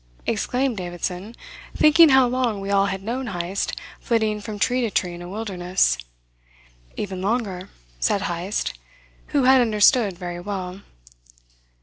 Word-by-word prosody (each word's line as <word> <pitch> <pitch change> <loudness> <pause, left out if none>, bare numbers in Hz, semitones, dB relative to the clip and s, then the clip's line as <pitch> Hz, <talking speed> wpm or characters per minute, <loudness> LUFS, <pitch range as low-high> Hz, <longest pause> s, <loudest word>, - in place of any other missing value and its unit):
exclaimed 250 +2 0
Davidson, 180 +4 -5 0.4
thinking 310 +1 +7
how 265 -1 +6
long 240 -4 0
we 195 0 -4
all 200 0 +3
had 195 -1 -4
known 245 +4 -3
Heyst 180 -1 -3 0.3
flitting 220 -3 0
from 210 0 -6
tree 250 +4 +1
to 235 - 0
tree 180 -3 -1
in 175 - -9
a 175 - -8
wilderness. 185 - 0 1.0
"Even 190 -3 -4
longer," 200 -3 -2 0.3
said 195 - +1
Heyst, 175 +3 -2 0.5
who 285 -3 +1
had 260 0 +6
understood 215 -2 +3
very 175 -1 -5
well. 185 0 -5
205 Hz, 135 wpm, -23 LUFS, 185-240 Hz, 1.0 s, thinking